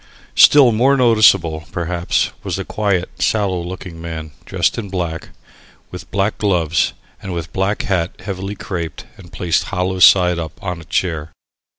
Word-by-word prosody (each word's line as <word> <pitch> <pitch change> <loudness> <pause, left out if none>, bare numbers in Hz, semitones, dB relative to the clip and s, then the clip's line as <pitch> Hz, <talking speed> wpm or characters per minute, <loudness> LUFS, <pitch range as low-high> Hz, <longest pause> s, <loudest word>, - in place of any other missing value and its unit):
Still 140 -4 +7
more 130 +5 +3
noticeable, 100 -10 +4
perhaps, 85 0 -1
was - - -3
the - - -4
quiet, 100 -4 -1
sallow 100 -5 +1
looking 85 -1 -8
man 80 -2 -6
dressed - - 0
in 105 -4 -6
black, 85 -3 -4 0.6
with - - -9
black 100 +2 -1
gloves 85 -6 +1 0.3
and 95 - -6
with 85 0 -6
black 95 +2 0
silk - - -7
hat 90 -3 0
heavily 95 0 -5
craped 85 -5 -5
and - - -14
placed 90 -1 0
hollow 95 0 -2
side 90 -1 +6
up 80 -2 -5
on 90 -3 -4
a - - -13
chair. 80 -2 -2
90 Hz, 160 wpm, -18 LUFS, 85-100 Hz, 0.6 s, Still